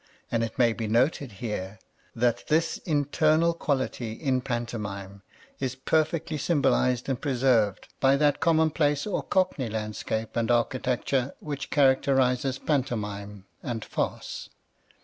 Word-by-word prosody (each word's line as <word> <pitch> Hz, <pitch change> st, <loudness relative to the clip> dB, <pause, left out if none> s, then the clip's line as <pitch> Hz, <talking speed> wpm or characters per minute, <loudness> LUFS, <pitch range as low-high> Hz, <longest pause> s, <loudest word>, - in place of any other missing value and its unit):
And 115 Hz, -1 st, +1 dB
it 115 Hz, -, -4 dB
may 120 Hz, -3 st, +4 dB
be 110 Hz, -1 st, -4 dB
noted 125 Hz, +2 st, +1 dB
here 100 Hz, -1 st, -5 dB, 0.4 s
that 120 Hz, 0 st, 0 dB
this 160 Hz, +1 st, +2 dB
internal 155 Hz, +2 st, +2 dB
quality 130 Hz, -7 st, -2 dB
in 130 Hz, 0 st, 0 dB
pantomime 105 Hz, -6 st, -4 dB, 0.4 s
is 130 Hz, -2 st, -2 dB
perfectly 155 Hz, +3 st, 0 dB
symbolized 130 Hz, -5 st, +2 dB
and 130 Hz, -3 st, -2 dB
preserved 125 Hz, -7 st, +2 dB
by 135 Hz, +1 st, +4 dB
that 145 Hz, 0 st, +2 dB
commonplace 155 Hz, -3 st, +2 dB
or 210 Hz, -, -1 dB
cockney 180 Hz, -10 st, 0 dB
landscape 110 Hz, 0 st, -3 dB
and 115 Hz, -1 st, 0 dB
architecture 125 Hz, +2 st, 0 dB
which 145 Hz, -2 st, -5 dB
characterizes 130 Hz, -2 st, +3 dB
pantomime 105 Hz, -9 st, -2 dB, 0.2 s
and 115 Hz, -3 st, -4 dB
farce. -, -, -4 dB
130 Hz, 120 wpm, -27 LUFS, 115-145 Hz, 0.4 s, may